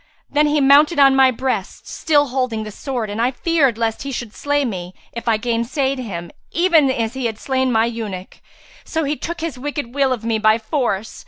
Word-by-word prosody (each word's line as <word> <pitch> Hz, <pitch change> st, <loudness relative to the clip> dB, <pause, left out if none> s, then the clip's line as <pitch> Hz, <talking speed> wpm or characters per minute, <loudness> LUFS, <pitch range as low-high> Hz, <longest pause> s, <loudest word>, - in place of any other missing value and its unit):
Then 300 Hz, +1 st, +3 dB
he 295 Hz, 0 st, +2 dB
mounted 290 Hz, +4 st, +5 dB
on 275 Hz, -1 st, +6 dB
my 265 Hz, -1 st, +6 dB
breast, 255 Hz, +1 st, -3 dB
still 290 Hz, -3 st, +1 dB
holding 250 Hz, -4 st, -1 dB
the 215 Hz, -, -7 dB
sword, 245 Hz, 0 st, -4 dB
and 215 Hz, +2 st, -2 dB
I 245 Hz, -, +3 dB
feared 275 Hz, -2 st, +1 dB
lest 225 Hz, -1 st, -1 dB
he 275 Hz, -, -5 dB
should 240 Hz, -4 st, -5 dB
slay 290 Hz, 0 st, 0 dB
me, 185 Hz, -5 st, -5 dB, 0.2 s
if 235 Hz, 0 st, -7 dB
I 225 Hz, -2 st, +3 dB
gainsaid 245 Hz, +4 st, -1 dB
him, 175 Hz, -8 st, -6 dB, 0.2 s
even 335 Hz, -5 st, +3 dB
as 230 Hz, -3 st, -1 dB
he 265 Hz, -2 st, -2 dB
had 220 Hz, -2 st, -5 dB
slain 260 Hz, +1 st, 0 dB
my 225 Hz, -1 st, +3 dB
eunuch; 215 Hz, -6 st, -6 dB, 0.4 s
so 320 Hz, 0 st, -2 dB
he 290 Hz, +1 st, -1 dB
took 340 Hz, +2 st, -5 dB
his 320 Hz, -6 st, -4 dB
wicked 290 Hz, -3 st, -4 dB
will 275 Hz, -2 st, +2 dB
of 235 Hz, -3 st, -3 dB
me 225 Hz, -1 st, 0 dB
by 215 Hz, 0 st, +4 dB
force. 225 Hz, -3 st, -2 dB
255 Hz, 210 wpm, -20 LUFS, 225-285 Hz, 0.4 s, on